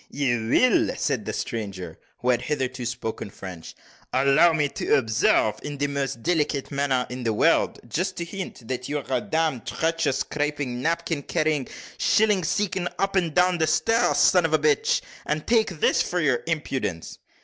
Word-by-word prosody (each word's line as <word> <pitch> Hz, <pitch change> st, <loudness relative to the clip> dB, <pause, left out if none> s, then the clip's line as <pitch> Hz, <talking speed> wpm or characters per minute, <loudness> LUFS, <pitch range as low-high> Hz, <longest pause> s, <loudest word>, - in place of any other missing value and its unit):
"You 120 Hz, -5 st, -1 dB
will!" 250 Hz, -, +3 dB
said 130 Hz, -8 st, -1 dB
the -, -, -2 dB
stranger, 95 Hz, -7 st, -5 dB, 0.2 s
who 125 Hz, -, +3 dB
had 120 Hz, -1 st, +1 dB
hitherto 130 Hz, -4 st, -2 dB
spoken 115 Hz, -3 st, -5 dB
French. 90 Hz, -4 st, -9 dB, 0.4 s
"Allow 140 Hz, +6 st, +4 dB
me 150 Hz, -2 st, +1 dB
to -, -, +1 dB
observe 110 Hz, -3 st, +2 dB
in 145 Hz, -1 st, -6 dB
the 145 Hz, -, 0 dB
most 140 Hz, -4 st, -3 dB
delicate 150 Hz, -5 st, 0 dB
manner 140 Hz, -3 st, 0 dB
in 125 Hz, +1 st, -5 dB
the 115 Hz, -2 st, 0 dB
world -, -, +2 dB
just 180 Hz, -, -2 dB
to 170 Hz, -, -4 dB
hint, 170 Hz, -, -7 dB
that 125 Hz, +1 st, -4 dB
you 150 Hz, -, -1 dB
are 145 Hz, -, -6 dB
a 130 Hz, -2 st, 0 dB
damned 160 Hz, -6 st, -1 dB
trencher 165 Hz, -2 st, 0 dB
scraping, 145 Hz, -2 st, -2 dB
napkin 165 Hz, 0 st, -1 dB
carrying, 155 Hz, -2 st, 0 dB, 0.3 s
shilling 210 Hz, -4 st, +3 dB
seeking, 185 Hz, +1 st, -1 dB
up 195 Hz, 0 st, -1 dB
and 170 Hz, -5 st, +1 dB
down 180 Hz, 0 st, +3 dB
stairs 225 Hz, +8 st, +2 dB
son 180 Hz, -2 st, +5 dB
of 165 Hz, -1 st, 0 dB
a -, -, +6 dB
bitch 150 Hz, -1 st, +2 dB, 0.3 s
and 150 Hz, 0 st, -1 dB
take 225 Hz, -2 st, +3 dB
this -, -, +3 dB
for 180 Hz, -, -1 dB
your 140 Hz, -7 st, +1 dB
impudence!" 135 Hz, -, -3 dB
145 Hz, 170 wpm, -24 LUFS, 125-165 Hz, 0.4 s, a